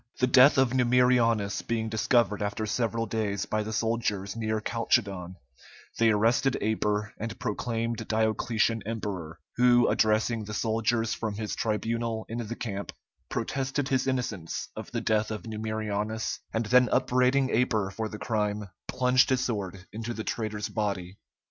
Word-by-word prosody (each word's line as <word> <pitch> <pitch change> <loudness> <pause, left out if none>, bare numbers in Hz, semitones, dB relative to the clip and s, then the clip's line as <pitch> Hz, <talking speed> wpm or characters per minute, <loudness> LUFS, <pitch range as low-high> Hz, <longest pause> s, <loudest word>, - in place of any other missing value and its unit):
The 125 - +4
death 130 +3 +6
of 130 -2 +4
Numerianus 125 -4 +3
being 115 -1 -2
discovered 110 -1 +2
after 105 +1 -2
several 115 +1 -1
days 105 -2 -2
by 110 - -1
the 110 +1 -4
soldiers 110 -3 -1
near 110 -1 -1
Calchedon, 100 -6 -1 0.6
they 115 0 +5
arrested 115 +5 +2
Aper 105 -1 -1
and 115 +1 -5
proclaimed 115 +1 -2
Diocletian 110 +1 +1
emperor, 95 -7 -4 0.2
who 120 -1 +5
addressing 110 +1 +2
the 105 +1 -5
soldiers 115 +1 0
from 110 -3 -3
his 105 0 -3
tribunal 115 +1 -1
in 115 +2 -4
the 120 0 -4
camp, 100 -4 -5 0.4
protested 135 0 -2
his 130 -1 +1
innocence 115 -10 -2
of - - -7
the - - -3
death 110 -1 +1
of 110 -2 -5
Numerianus, 110 -1 -3
and 115 0 -1
then 125 +3 +5
upbraiding 130 +2 +2
Aper 110 -5 +1
for 110 +2 -4
the 105 - -7
crime, 105 -2 -2 0.2
plunged 125 0 +3
his 130 0 +2
sword 95 -5 -4
into 115 +2 -4
the 110 - -4
traitor's 110 -2 -3
body. 100 -3 -3
110 Hz, 150 wpm, -28 LUFS, 105-120 Hz, 0.6 s, death